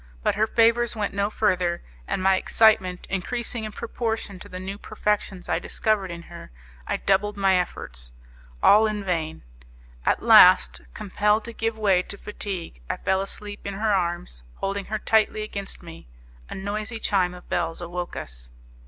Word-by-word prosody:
But -, -, +2 dB
her 215 Hz, +1 st, +1 dB
favours 235 Hz, +1 st, +3 dB
went 210 Hz, -2 st, -2 dB
no 200 Hz, +1 st, 0 dB
further; 180 Hz, -5 st, 0 dB, 0.2 s
and 185 Hz, -, -2 dB
my 190 Hz, 0 st, +5 dB
excitement 190 Hz, -3 st, +3 dB
increasing 225 Hz, +4 st, -1 dB
in 215 Hz, -, -5 dB
proportion 225 Hz, -3 st, -3 dB
to -, -, -11 dB
the 185 Hz, -, -7 dB
new 195 Hz, +2 st, -6 dB
perfections 210 Hz, -4 st, -2 dB
I -, -, +1 dB
discovered 215 Hz, -4 st, 0 dB
in 170 Hz, -1 st, -7 dB
her, 170 Hz, 0 st, -11 dB, 0.4 s
I -, -, 0 dB
doubled 205 Hz, +1 st, +1 dB
my 195 Hz, -1 st, +3 dB
efforts; 60 Hz, -, -4 dB, 0.5 s
all 215 Hz, +2 st, +7 dB
in 210 Hz, -1 st, -3 dB
vain. 165 Hz, -4 st, -2 dB, 0.6 s
At -, -, +1 dB
last, 65 Hz, -2 st, +7 dB
compelled 210 Hz, +2 st, +1 dB
to 235 Hz, -, -7 dB
give 225 Hz, 0 st, -2 dB
way 195 Hz, -4 st, +3 dB
to 200 Hz, -, -7 dB
fatigue, 190 Hz, -, -6 dB
I -, -, -1 dB
fell 190 Hz, 0 st, +1 dB
asleep 205 Hz, +1 st, -5 dB
in 200 Hz, -, -4 dB
her 215 Hz, +1 st, +1 dB
arms, 175 Hz, -, -2 dB
holding 195 Hz, 0 st, -3 dB
her 215 Hz, -, -2 dB
tightly, 215 Hz, 0 st, +2 dB
against 200 Hz, -3 st, -5 dB
me. 165 Hz, -, -11 dB, 0.4 s
A -, -, -6 dB
noisy 210 Hz, +4 st, -3 dB
chime 185 Hz, -4 st, +1 dB
of 180 Hz, -, -14 dB
bells 165 Hz, -1 st, -1 dB
woke 175 Hz, +1 st, -5 dB
us. -, -, -3 dB
195 Hz, 170 wpm, -25 LUFS, 180-215 Hz, 0.6 s, all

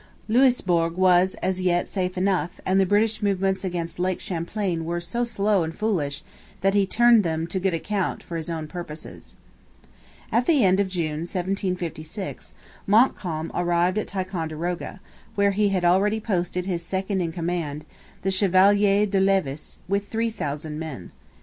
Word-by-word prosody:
Louisbourg 190 Hz, -9 st, +3 dB
was, 185 Hz, 0 st, +4 dB
as 185 Hz, 0 st, 0 dB
yet, 175 Hz, -1 st, +1 dB
safe 185 Hz, -2 st, -2 dB
enough; 185 Hz, -2 st, 0 dB
and 190 Hz, +1 st, +3 dB
the 190 Hz, -, +3 dB
British 215 Hz, +3 st, +2 dB
movements 195 Hz, -1 st, 0 dB
against 175 Hz, -2 st, -4 dB
Lake 185 Hz, 0 st, 0 dB
Champlain 175 Hz, 0 st, -3 dB
were 170 Hz, +1 st, -2 dB
so 180 Hz, +8 st, -2 dB
slow 205 Hz, -4 st, +1 dB
and 165 Hz, 0 st, -3 dB
foolish 165 Hz, -10 st, -1 dB, 0.4 s
that 195 Hz, 0 st, +2 dB
he 200 Hz, -1 st, +3 dB
turned 235 Hz, +2 st, +5 dB
them 160 Hz, -1 st, -1 dB
to 185 Hz, +3 st, -3 dB
good 185 Hz, -2 st, 0 dB
account 195 Hz, +3 st, -2 dB
for 170 Hz, -, -7 dB
his 165 Hz, 0 st, -4 dB
own 160 Hz, -2 st, -3 dB
purposes. 160 Hz, -1 st, -8 dB, 1.0 s
At 235 Hz, +2 st, +2 dB
the 295 Hz, -7 st, +4 dB
end 190 Hz, +1 st, +4 dB
of 200 Hz, -, +2 dB
June, 165 Hz, -5 st, -2 dB
1756, 180 Hz, 0 st, -4 dB, 0.3 s
Montcalm 185 Hz, -7 st, +2 dB
arrived 175 Hz, +2 st, +1 dB
at -, -, -4 dB
Ticonderoga, 175 Hz, -1 st, -4 dB, 0.4 s
where 200 Hz, 0 st, +3 dB
he 205 Hz, +1 st, +2 dB
had 185 Hz, -2 st, 0 dB
already 200 Hz, +5 st, +3 dB
posted 180 Hz, -4 st, -2 dB
his 180 Hz, -3 st, -2 dB
second 190 Hz, +2 st, -2 dB
in 170 Hz, -2 st, -1 dB
command, 165 Hz, -3 st, -3 dB, 0.4 s
the 195 Hz, -, +1 dB
Chevalier 200 Hz, +2 st, +4 dB
de 195 Hz, -1 st, 0 dB
Levis, 190 Hz, -7 st, 0 dB
with 200 Hz, +1 st, -1 dB
3,000 155 Hz, -10 st, -3 dB
men. 150 Hz, -, -7 dB
185 Hz, 155 wpm, -24 LUFS, 170-200 Hz, 1.0 s, turned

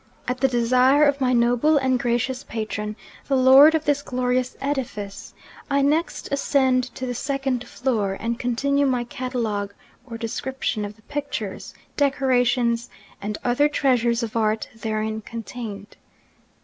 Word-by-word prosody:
At 250 Hz, +1 st, -2 dB
the 270 Hz, -, +4 dB
desire 255 Hz, +4 st, +4 dB
of 285 Hz, -1 st, +1 dB
my 255 Hz, -1 st, +2 dB
noble 245 Hz, +5 st, +3 dB
and 260 Hz, -2 st, +1 dB
gracious 245 Hz, +2 st, -1 dB
patron, 215 Hz, -1 st, -4 dB, 0.3 s
the 275 Hz, -, +2 dB
lord 270 Hz, +5 st, +8 dB
of 315 Hz, -, -1 dB
this 290 Hz, -1 st, +2 dB
glorious 250 Hz, -1 st, -1 dB
edifice, 240 Hz, -8 st, -4 dB, 0.3 s
I 280 Hz, 0 st, +2 dB
next 310 Hz, +5 st, 0 dB
ascend 265 Hz, -2 st, +2 dB
to 260 Hz, -, -4 dB
the 245 Hz, -, -3 dB
second 270 Hz, -1 st, -2 dB
floor, 215 Hz, -7 st, -1 dB
and 235 Hz, +1 st, -2 dB
continue 280 Hz, +4 st, +1 dB
my 250 Hz, -2 st, +1 dB
catalogue 230 Hz, -5 st, -3 dB, 0.3 s
or 230 Hz, -2 st, -6 dB
description 230 Hz, -1 st, -3 dB
of 205 Hz, +1 st, -8 dB
the 220 Hz, -, -25 dB
pictures, 280 Hz, -8 st, -5 dB, 0.2 s
decorations, 245 Hz, -4 st, +2 dB, 0.3 s
and 210 Hz, +1 st, -3 dB
other 250 Hz, +5 st, +3 dB
treasures 240 Hz, -5 st, +1 dB
of 225 Hz, -1 st, -5 dB
art 220 Hz, -1 st, 0 dB
therein 220 Hz, -1 st, -3 dB
contained. 225 Hz, -2 st, -8 dB
250 Hz, 140 wpm, -23 LUFS, 230-270 Hz, 0.3 s, lord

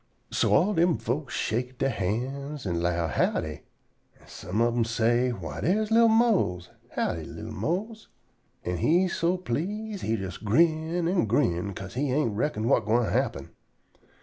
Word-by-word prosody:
So -, -, +1 dB
all 205 Hz, +5 st, +3 dB
dem 170 Hz, -, +3 dB
folks 125 Hz, +5 st, -3 dB
shake 125 Hz, +3 st, -2 dB
dere 135 Hz, -, +1 dB
hands 130 Hz, +8 st, -3 dB
an' 85 Hz, -3 st, -1 dB
'low 85 Hz, -1 st, 0 dB
"Howdy," 80 Hz, -1 st, -1 dB, 0.6 s
an' -, -, -21 dB
some 90 Hz, +5 st, -5 dB
ob 120 Hz, 0 st, +3 dB
dem 120 Hz, -1 st, +2 dB
say: 115 Hz, +2 st, +2 dB
"Why, 85 Hz, -10 st, -5 dB
dere's 210 Hz, +6 st, +1 dB
li'l 230 Hz, +1 st, +6 dB
Mose! 220 Hz, -, +2 dB, 0.2 s
Howdy, -, -, -1 dB
li'l -, -, -8 dB
Mose?" 215 Hz, +6 st, -3 dB, 0.6 s
An' 90 Hz, 0 st, -1 dB
he 175 Hz, -, +3 dB
so 175 Hz, +1 st, 0 dB
please 200 Hz, -, -3 dB
he 110 Hz, -, 0 dB
jes 95 Hz, -4 st, -5 dB
grin 160 Hz, +8 st, +2 dB
an' 175 Hz, -, +1 dB
grin, 100 Hz, -6 st, +1 dB
'ca'se 95 Hz, 0 st, -7 dB
he 135 Hz, +2 st, -1 dB
ain't 130 Hz, -6 st, +1 dB
reckon 110 Hz, -1 st, -1 dB
whut 120 Hz, -1 st, +3 dB
gwine 115 Hz, +2 st, +2 dB
happen. -, -, -1 dB
125 Hz, 160 wpm, -27 LUFS, 105-170 Hz, 0.6 s, li'l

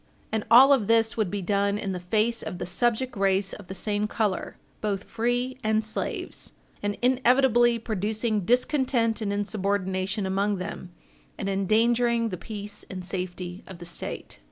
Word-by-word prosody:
And 220 Hz, -1 st, 0 dB
all 260 Hz, +5 st, +9 dB
of 230 Hz, -7 st, +1 dB
this 225 Hz, -1 st, +3 dB
would 215 Hz, -5 st, 0 dB
be 200 Hz, 0 st, -3 dB
done 200 Hz, +2 st, +1 dB
in 200 Hz, -2 st, -3 dB
the 180 Hz, -, -3 dB
face 215 Hz, +6 st, 0 dB
of 180 Hz, -, -5 dB
the -, -, -4 dB
subject 240 Hz, +7 st, 0 dB
race 195 Hz, 0 st, +1 dB
of 205 Hz, -, -10 dB
the 190 Hz, -, -6 dB
same 210 Hz, +2 st, -1 dB
color, 210 Hz, -3 st, -2 dB, 0.2 s
both 200 Hz, -2 st, -1 dB
free 245 Hz, +3 st, -1 dB
and 220 Hz, 0 st, +2 dB
slaves, 220 Hz, +1 st, -4 dB, 0.3 s
and 205 Hz, 0 st, -2 dB
inevitably 250 Hz, -2 st, +4 dB
producing 220 Hz, 0 st, -1 dB
discontent 245 Hz, -, +1 dB
and 205 Hz, -2 st, -1 dB
insubordination 200 Hz, -1 st, -1 dB
among 200 Hz, +2 st, +1 dB
them, 185 Hz, -1 st, -6 dB, 0.5 s
and 195 Hz, -, -3 dB
endangering 230 Hz, +4 st, +2 dB
the 180 Hz, -, -4 dB
peace 205 Hz, +2 st, -7 dB
and 185 Hz, -1 st, -6 dB
safety 180 Hz, 0 st, -5 dB
of 190 Hz, -, -9 dB
the 175 Hz, -, -9 dB
State. 170 Hz, -, -6 dB
210 Hz, 160 wpm, -26 LUFS, 195-230 Hz, 0.5 s, all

